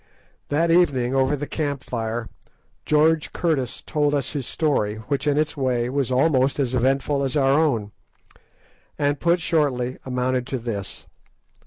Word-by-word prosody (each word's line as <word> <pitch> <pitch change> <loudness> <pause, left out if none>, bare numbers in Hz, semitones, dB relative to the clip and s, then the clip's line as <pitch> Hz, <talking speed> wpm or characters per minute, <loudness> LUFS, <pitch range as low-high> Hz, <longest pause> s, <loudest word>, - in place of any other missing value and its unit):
That 165 +3 +2
evening, 135 -8 +3
over 135 +2 +2
the 145 +1 -4
camp 145 -3 -3
fire, 115 -1 -3 0.6
George 155 +1 +3
Curtis 155 -8 -1
told 145 -1 0
us 135 -3 -1
his 140 -5 -4
story, 135 -10 0
which, 135 +6 -3
in 145 0 +2
its 155 +1 0
way, 125 -3 0
was 135 -2 -1
almost 135 0 +2
as 130 -3 0
eventful 135 +3 +1
as 135 +2 -1
our 135 -1 +3
own, 130 -9 +1 1.1
and, 145 0 0
put 170 +1 +2
shortly, 135 -7 0
amounted 125 0 -1
to 135 - -2
this. 115 -5 -5
135 Hz, 150 wpm, -23 LUFS, 125-150 Hz, 1.1 s, evening